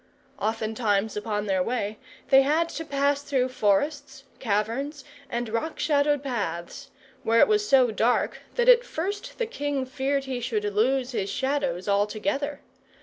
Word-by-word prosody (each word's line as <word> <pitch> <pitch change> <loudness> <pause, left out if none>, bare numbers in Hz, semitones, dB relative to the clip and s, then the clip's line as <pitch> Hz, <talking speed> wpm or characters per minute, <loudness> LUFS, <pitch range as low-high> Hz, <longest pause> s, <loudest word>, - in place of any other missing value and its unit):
Oftentimes 220 -1 0
upon 210 -1 -2
their 190 -2 +1
way 215 0 -2 0.3
they 270 0 +7
had 310 +5 +1
to 325 - -5
pass 280 -1 0
through 260 -3 0
forests, 270 +5 0 0.2
caverns, 250 +6 -2 0.3
and 240 0 -2
rock 230 +9 -3
shadowed 290 -1 +2
paths, 185 - -4 0.3
where 230 +1 +3
it - - +7
was 420 -1 +1
so 255 -4 +5
dark 230 +3 +1 0.2
that 485 0 +1
at - - +7
first 405 +1 -4
the 470 - 0
king 290 - -2
feared 275 +1 -1
he 265 -2 -4
should 230 -4 -2
lose 245 +6 +1
his 200 -5 -2
Shadows 265 -8 -1
altogether. 210 +8 0
260 Hz, 145 wpm, -26 LUFS, 215-285 Hz, 0.3 s, they